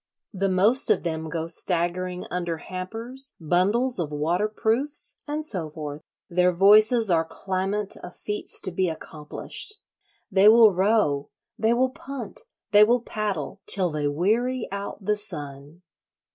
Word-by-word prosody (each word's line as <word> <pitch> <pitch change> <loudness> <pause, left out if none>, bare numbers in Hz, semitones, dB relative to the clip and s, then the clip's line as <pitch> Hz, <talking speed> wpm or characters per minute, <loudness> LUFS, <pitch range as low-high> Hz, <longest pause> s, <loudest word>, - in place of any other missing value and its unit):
The 195 0 0
most 205 +8 +3
of - - +2
them 160 -2 -3
go 160 +1 -3
staggering 180 +1 +1
under 175 -2 -2
hampers, 225 +11 -6
bundles 195 +9 +2
of 155 -4 -2
waterproofs, 215 - +1
and 300 +1 -3
so 180 - -2
forth. 150 -1 -7 0.3
Their 180 +1 +2
voices 215 +4 +5
are 165 -1 +3
clamant 190 +4 -3
of 180 - -10
feats 210 0 -3
to 185 - -3
be 180 +1 0
accomplished: 160 - -6 0.6
they 195 +1 +5
will 220 -1 +7
row, 185 -7 +1 0.3
they 225 +1 +2
will 255 +1 +1
punt, 260 -5 -8 0.3
they 205 +1 +7
will 240 +2 +2
paddle, 205 -7 -4
till 185 -4 +3
they 150 -1 -1
weary 225 - 0
out 200 0 -6
the 210 - +2
sun. 150 -4 -6
190 Hz, 140 wpm, -24 LUFS, 165-220 Hz, 0.6 s, will